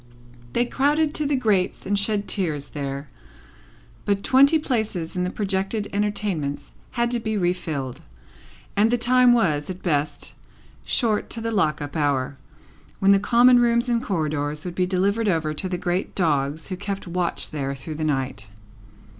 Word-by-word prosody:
They 240 Hz, -, +2 dB
crowded 295 Hz, +4 st, +1 dB
to 300 Hz, -, 0 dB
the 285 Hz, -, +1 dB
grates 210 Hz, -8 st, 0 dB
and 200 Hz, -, -1 dB
shed 205 Hz, 0 st, -1 dB
tears 155 Hz, -8 st, -2 dB
there; 140 Hz, 0 st, -5 dB, 1.0 s
but, 200 Hz, -1 st, 0 dB
twenty 280 Hz, +4 st, +5 dB
places 220 Hz, -, -2 dB
in 180 Hz, -, 0 dB
the 180 Hz, -, -1 dB
projected 195 Hz, +2 st, -1 dB
entertainments 200 Hz, -8 st, -2 dB, 0.2 s
had 235 Hz, 0 st, 0 dB
to 240 Hz, -, +1 dB
be 220 Hz, -1 st, -2 dB
refilled, 160 Hz, -8 st, -2 dB, 0.7 s
and 210 Hz, +2 st, +4 dB
the 245 Hz, -, +2 dB
time 250 Hz, +1 st, +5 dB
was, 155 Hz, -11 st, +2 dB
at 185 Hz, 0 st, -7 dB
best, 150 Hz, -4 st, -1 dB, 0.5 s
short 220 Hz, -4 st, +1 dB
to 230 Hz, -, -4 dB
the 230 Hz, 0 st, -2 dB
lock 155 Hz, -8 st, +1 dB
up 145 Hz, +1 st, -7 dB
hour, 140 Hz, -3 st, 0 dB, 0.6 s
when 195 Hz, +1 st, +4 dB
the 200 Hz, -, +6 dB
common 245 Hz, +4 st, +5 dB
rooms 235 Hz, 0 st, +2 dB
and 235 Hz, -1 st, +1 dB
corridors 155 Hz, -, -2 dB
would 180 Hz, -, -4 dB
be 180 Hz, +1 st, 0 dB
delivered 200 Hz, +4 st, +1 dB
over 160 Hz, -4 st, 0 dB
to 185 Hz, +5 st, -2 dB
the 180 Hz, -, -2 dB
great 175 Hz, +2 st, -2 dB
dogs 150 Hz, -2 st, 0 dB
who 185 Hz, -, -2 dB
kept 200 Hz, 0 st, -4 dB
watch 175 Hz, 0 st, -2 dB
there 140 Hz, -3 st, -3 dB
through 135 Hz, +4 st, -7 dB
the 155 Hz, +1 st, -4 dB
night. 135 Hz, -7 st, -2 dB
190 Hz, 165 wpm, -23 LUFS, 155-225 Hz, 1.0 s, the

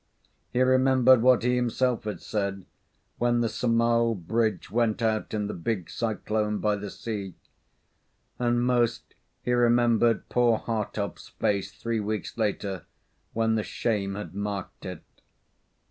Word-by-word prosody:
He 125 Hz, +1 st, +3 dB
remembered 130 Hz, -1 st, +5 dB
what 125 Hz, -1 st, +5 dB
he 125 Hz, +1 st, +2 dB
himself 125 Hz, -1 st, 0 dB
had 105 Hz, -5 st, -4 dB
said 100 Hz, -2 st, -2 dB, 0.5 s
when 120 Hz, 0 st, +2 dB
the 115 Hz, -, +2 dB
Sumao 115 Hz, 0 st, +2 dB
Bridge 110 Hz, +3 st, -1 dB
went 115 Hz, -1 st, +1 dB
out 110 Hz, -2 st, 0 dB
in 105 Hz, -1 st, -1 dB
the 100 Hz, -, -4 dB
big 90 Hz, 0 st, -3 dB
cyclone 110 Hz, -1 st, -1 dB
by 105 Hz, 0 st, +1 dB
the 100 Hz, 0 st, -6 dB
sea; 100 Hz, -5 st, -5 dB, 1.0 s
and 120 Hz, 0 st, +2 dB
most 120 Hz, -2 st, 0 dB, 0.3 s
he 125 Hz, -, 0 dB
remembered 120 Hz, -1 st, +3 dB
poor 120 Hz, -2 st, +3 dB
Hartopp's 105 Hz, -3 st, -4 dB
face 100 Hz, -1 st, -1 dB
three 115 Hz, +3 st, -3 dB
weeks 105 Hz, -1 st, -3 dB
later, 100 Hz, -4 st, -2 dB, 0.5 s
when 110 Hz, 0 st, +1 dB
the 110 Hz, -, +1 dB
shame 100 Hz, -5 st, -1 dB
had 105 Hz, -1 st, -6 dB
marked 100 Hz, -1 st, -5 dB
it. -, -, -7 dB
115 Hz, 135 wpm, -27 LUFS, 105-120 Hz, 1.0 s, remembered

